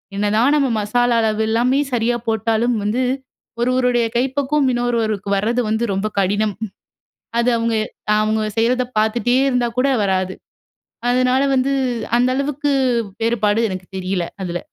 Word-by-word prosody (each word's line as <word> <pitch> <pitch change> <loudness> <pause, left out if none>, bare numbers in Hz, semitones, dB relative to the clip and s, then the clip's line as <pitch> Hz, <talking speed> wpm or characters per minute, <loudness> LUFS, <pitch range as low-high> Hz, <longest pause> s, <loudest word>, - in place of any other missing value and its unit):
என்னதான் 215 +7 +2
நம்ம 280 -2 +2
மசாலா 240 +3 +1
அளவு 220 -1 0
எல்லாமே 245 +5 +2
சரியா 240 0 +1
போட்டாலும் 225 +2 +1
வந்து, 225 +5 0 0.6
ஒருவருடைய 250 -1 +2
கைப்பக்குவம், 270 +3 +1
இன்னொருவருக்கு 225 -4 -1
வரது 230 +5 0
வந்து 220 +2 0
ரொம்ப 195 +2 -1
கடினம்! 205 +2 0 0.8
அது 235 +1 +2
அவங்க 230 0 0 0.5
அவங்க 215 0 0 0.2
செய்றத 250 +2 +2
பார்த்துட்டே 235 +3 +1
இருந்தா 245 -2 +1
கூட 270 - +3 0.2
வராது. 190 -1 0 0.8
அதுனால 255 +1 +2
வந்து 265 +1 +1 0.5
அந்த 250 +1 +3
அளவுக்கு 285 +1 -1 0.5
வேறுபாடு 225 -1 +1
எனக்கு 185 -1 -6
தெரியல. 185 -1 -2 0.2
அதுல. 175 -1 -3
235 Hz, 125 wpm, -19 LUFS, 210-250 Hz, 0.8 s, கூட